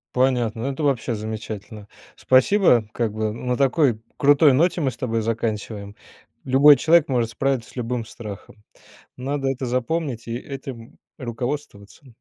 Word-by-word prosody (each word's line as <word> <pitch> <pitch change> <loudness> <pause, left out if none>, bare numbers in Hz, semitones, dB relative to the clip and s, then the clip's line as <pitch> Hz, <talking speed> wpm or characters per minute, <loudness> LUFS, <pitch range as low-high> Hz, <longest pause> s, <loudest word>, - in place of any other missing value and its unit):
Понятно! 125 -3 +1
Ну, 140 - -1
это 150 +3 -5
вообще 125 -4 0
замечательно! 110 -1 -7 0.3
Спасибо, 130 - +4
как 115 -3 -2
бы 110 0 -2
на 125 +3 -3
такой 135 -3 +2 0.2
крутой 145 +1 +5
ноте 170 +5 +2
мы 135 -3 +1
с - - -13
тобой 115 -4 -1
заканчиваем. 105 -2 -3 0.5
Любой 140 +3 +7
человек 160 +3 +4
может 120 -4 0
справиться 135 -2 -1
с - - -18
любым 120 0 -2
страхом. 105 -1 -10 0.6
Надо 135 +1 -2
это 135 0 -2
запомнить 125 0 -2
и 115 0 -3
этим 130 -3 -9 0.2
руководствоваться. 120 -1 -6
125 Hz, 145 wpm, -22 LUFS, 115-140 Hz, 0.6 s, Любой